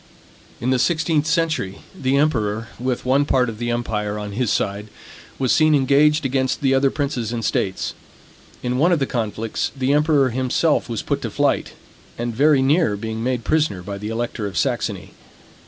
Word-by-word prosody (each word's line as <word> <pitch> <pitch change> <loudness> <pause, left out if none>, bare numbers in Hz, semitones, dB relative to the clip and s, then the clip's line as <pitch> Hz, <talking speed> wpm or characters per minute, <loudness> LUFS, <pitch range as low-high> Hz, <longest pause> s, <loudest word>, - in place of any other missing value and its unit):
In 125 - 0
the 130 - +2
sixteenth 160 0 +1
century, 155 - 0 0.2
the 135 -6 0
emperor, 115 -7 0
with 125 0 -2
one 135 +3 +3
part 125 -3 +2
of 110 -1 -8
the 120 0 -2
empire 105 -3 -2
on 105 -1 -5
his 115 +2 -1
side, 100 +1 -1 0.5
was 130 -2 +1
seen 155 -1 +4
engaged 145 +3 +3
against 130 -1 0
the 135 -1 +3
other 135 +1 +3
princes 135 -6 -2
and 115 -2 -3
states. 95 -1 -1 0.7
In 125 0 -1
one 170 +5 +4
of 175 - +4
the 140 - 0
conflicts, 115 -2 -2
the 130 +1 +1
emperor 145 -3 +3
himself 130 +4 +1
was 115 -3 -3
put - - -2
to - - -3
flight, - - 0 0.4
and 120 0 -3
very 140 +2 +4
near 135 - +2
being 110 +1 -4
made 125 -1 -1
prisoner 150 - 0
by 100 +1 -6
the 105 +1 -5
elector 115 -1 -3
of 95 -4 -6
Saxony. - - -1
125 Hz, 180 wpm, -21 LUFS, 110-145 Hz, 0.7 s, seen